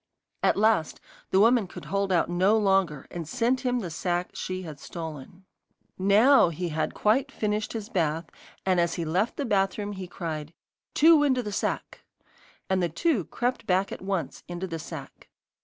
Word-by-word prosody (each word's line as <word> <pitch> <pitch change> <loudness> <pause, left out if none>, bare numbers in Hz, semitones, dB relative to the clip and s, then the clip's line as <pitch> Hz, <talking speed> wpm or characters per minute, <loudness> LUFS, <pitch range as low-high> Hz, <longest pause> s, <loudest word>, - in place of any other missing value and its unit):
At - - +3
last 210 -7 +2 0.3
the 190 - +3
woman 230 -1 +4
could - - -10
hold 200 -1 -1
out 175 -2 +3
no 185 +5 +3
longer, 195 -8 +1
and 170 -3 -5
sent 250 +1 +1
him 250 -1 0
the 175 -5 -5
sack 175 +2 -2
she 185 0 -4
had 155 -4 -8
stolen. 160 +3 -8 0.5
NOW 205 +5 +6
he 170 +2 -3
had 155 0 -2
quite 260 +6 +2
finished 210 -3 -2
his 220 -3 -5
bath, 165 -5 0 0.4
and 185 -2 +3
as 170 -1 +1
he 170 - -3
left 185 +8 0
the 285 - -1
bathroom 205 -1 0
he 190 -2 -6
cried: 160 -3 -5 0.4
'Two 320 0 +7
into 260 -4 +2
the 210 - -5
sack.' 200 - -3 0.6
And 190 -1 +1
the 175 - +1
two 230 - 0
crept 245 -2 -2
back 190 +1 +2
at - - -6
once 190 -2 -3
into 175 +1 -4
the 165 -3 -5
sack. 150 -3 -9
190 Hz, 175 wpm, -27 LUFS, 170-220 Hz, 0.6 s, Two